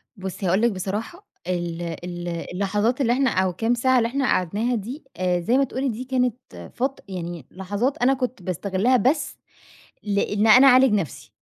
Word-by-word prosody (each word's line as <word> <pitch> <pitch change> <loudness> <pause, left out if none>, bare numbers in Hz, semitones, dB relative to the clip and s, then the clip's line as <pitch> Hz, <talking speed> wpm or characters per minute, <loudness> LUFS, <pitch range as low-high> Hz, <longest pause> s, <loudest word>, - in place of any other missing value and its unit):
بُصّي 190 -1 -6
هاقول 190 +5 +2
لِك 235 -1 +3
بصراحة، 210 - -5 0.2
ال 175 -2 -2
ال 175 +1 -6
اللحظات 200 +8 -1
اللي 240 -2 +3
إحنا 265 +1 +2
أو 185 -3 0
كام 225 +6 0
ساعة 260 +2 +2
اللي 230 - +2
إحنا 270 +2 -1
قعدناها 215 +5 0
دي، 240 +8 -6
آآ، 180 0 +1
زي 230 +9 +1
ما 275 - +4
تقولِي 265 +1 -2
دي 235 +2 -4
كانت 250 -2 0 0.4
فت 265 +2 -2
يعني 175 -6 -6
لحظات 205 +8 -2
أنا 250 +2 +3
كنت 255 -4 -3
باستغلها 190 +7 +1
بس 290 +5 0 0.7
لإن 205 +1 0
أنا 255 +5 +8
أعالج 255 -2 +6
نَفسي، 195 -7 -3
215 Hz, 175 wpm, -23 LUFS, 185-255 Hz, 0.7 s, أنا